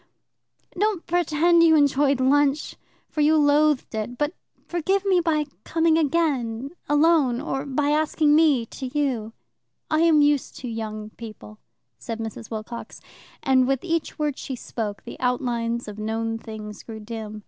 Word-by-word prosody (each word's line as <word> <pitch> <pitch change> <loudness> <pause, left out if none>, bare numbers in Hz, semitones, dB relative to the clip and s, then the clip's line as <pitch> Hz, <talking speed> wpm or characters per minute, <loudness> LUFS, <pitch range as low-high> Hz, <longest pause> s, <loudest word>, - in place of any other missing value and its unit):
Don't 415 -4 0
pretend 340 0 +3
you 325 -1 +6
enjoyed 285 -2 +3
lunch, 285 +2 +2 0.3
for 305 - -2
you 310 +1 +4
loathed 295 -2 +3
it, 220 +3 -4
but 295 +3 -1 0.3
forgive 380 +3 0
me 380 -2 +4
by 315 -3 +1 0.2
coming 325 0 +2
again, 280 -6 0 0.2
alone, 295 -5 +3
or 270 +2 -3
by 285 +2 0
asking 305 0 +2
me 300 -7 +4
to 260 +3 -7
you." 245 -7 -1 0.6
"I 310 - +3
am 320 -3 +5
used 290 -2 +1
to 255 - -7
young 215 -2 -5
people," 215 -1 -11 0.4
said 230 -3 -5
Mrs. 225 0 -6
Wilcox, 225 +1 -7 0.4
and 260 -1 +3
with 270 -1 0
each 335 -2 -2
word 300 -3 -2
she 265 - -5
spoke 215 -4 -5
the - - -9
outlines 240 -2 -1
of 210 0 -8
known 225 +1 -2
things 215 -2 -8
grew 220 -1 -9
dim. 215 -1 -7
275 Hz, 150 wpm, -24 LUFS, 230-310 Hz, 0.6 s, you